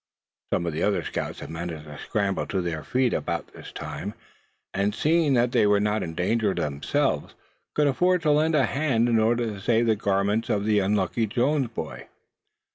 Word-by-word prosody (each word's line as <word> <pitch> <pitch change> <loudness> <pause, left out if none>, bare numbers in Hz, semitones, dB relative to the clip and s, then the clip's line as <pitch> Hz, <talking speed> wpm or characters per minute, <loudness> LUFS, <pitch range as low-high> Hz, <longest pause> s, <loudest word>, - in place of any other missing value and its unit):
Some 85 - +1
of 85 - -2
the 80 - -3
other 100 -5 +1
scouts - - -4
had - - -7
managed 80 -1 -5
to 75 -1 -10
scramble 100 -3 -1
to 95 - -1
their 85 -4 -3
feet 125 - +1
about - - -3
this - - -11
time; - - -6 0.6
and 100 +1 0
seeing 155 -3 +3
that 120 0 +2
they 115 -4 +4
were 105 0 +4
not 105 +1 0
in 80 -1 -5
danger 100 +3 +1
themselves, 70 -1 -1 0.4
could 150 - +3
afford 180 +6 +2
to 150 - +3
lend 155 +2 +3
a 140 -3 +4
hand 135 -4 +1
in 115 -2 +3
order 120 +2 +2
to 105 -3 -5
save 115 +3 +2
the 110 -1 +3
garments 100 +2 0
of 100 0 0
the 105 -1 +3
unlucky 100 +3 +1
Jones 130 +5 +1
boy. 115 - -7
110 Hz, 195 wpm, -25 LUFS, 95-125 Hz, 0.6 s, they